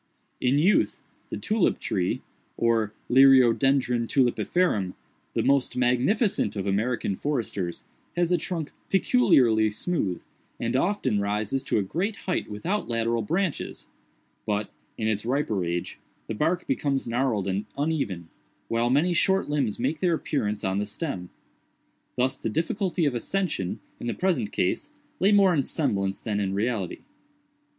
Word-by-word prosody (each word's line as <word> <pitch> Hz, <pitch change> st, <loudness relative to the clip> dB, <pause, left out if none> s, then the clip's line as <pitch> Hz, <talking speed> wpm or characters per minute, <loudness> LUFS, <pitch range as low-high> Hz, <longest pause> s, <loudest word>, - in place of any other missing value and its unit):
In 125 Hz, +3 st, +2 dB
youth, 180 Hz, +8 st, +2 dB, 0.3 s
the -, -, -4 dB
tulip 215 Hz, -3 st, +1 dB
tree, 90 Hz, -3 st, -1 dB, 0.3 s
or 115 Hz, -3 st, +2 dB, 0.2 s
Liriodendron 130 Hz, -1 st, +5 dB
Tulipferum, 125 Hz, -, +1 dB, 0.4 s
the -, -, +1 dB
most 140 Hz, -2 st, +2 dB
magnificent 125 Hz, -, +2 dB
of 100 Hz, -2 st, -3 dB
American 100 Hz, +1 st, 0 dB
foresters, 105 Hz, -, -3 dB, 0.3 s
has 175 Hz, 0 st, +1 dB
a 180 Hz, -, +4 dB
trunk 165 Hz, -2 st, -4 dB, 0.2 s
peculiarly 125 Hz, -, +4 dB
smooth, 105 Hz, -, -2 dB, 0.4 s
and 120 Hz, +1 st, -1 dB
often 135 Hz, -, +1 dB
rises 105 Hz, +5 st, -1 dB
to -, -, +1 dB
a 105 Hz, -, +2 dB
great 185 Hz, -, -2 dB
height 185 Hz, -, -1 dB
without 170 Hz, -, -2 dB
lateral 115 Hz, 0 st, 0 dB
branches; 170 Hz, -, -2 dB, 0.6 s
but, 105 Hz, 0 st, -1 dB, 0.3 s
in 110 Hz, -, -1 dB
its 105 Hz, -2 st, 0 dB
riper 120 Hz, -6 st, 0 dB
age, 85 Hz, 0 st, -3 dB, 0.3 s
the -, -, -4 dB
bark 160 Hz, +10 st, 0 dB
becomes 140 Hz, -, -1 dB
gnarled 115 Hz, -4 st, 0 dB
and 100 Hz, +2 st, -2 dB
uneven, 140 Hz, -, -1 dB, 0.4 s
while 115 Hz, +1 st, +1 dB
many 155 Hz, +8 st, +3 dB
short 190 Hz, 0 st, +2 dB
limbs 135 Hz, -8 st, 0 dB
make 140 Hz, +6 st, -1 dB
their 175 Hz, -3 st, +2 dB
appearance 105 Hz, -10 st, -2 dB
on 95 Hz, 0 st, 0 dB
the 105 Hz, -, -2 dB
stem. 105 Hz, -, -4 dB, 0.9 s
Thus 130 Hz, +1 st, 0 dB
the -, -, -2 dB
difficulty 175 Hz, -, 0 dB
of 140 Hz, -, +1 dB
ascension, 125 Hz, -, -2 dB, 0.2 s
in -, -, -5 dB
the 120 Hz, -, -1 dB
present 155 Hz, -, 0 dB
case, 95 Hz, -, -1 dB, 0.3 s
lay 195 Hz, -, +4 dB
more 200 Hz, -3 st, +5 dB
in 150 Hz, -, +3 dB
semblance 100 Hz, -, -1 dB
than 105 Hz, -3 st, -1 dB
in 95 Hz, -1 st, -1 dB
reality. 105 Hz, -3 st, -2 dB
125 Hz, 145 wpm, -26 LUFS, 105-165 Hz, 0.9 s, Liriodendron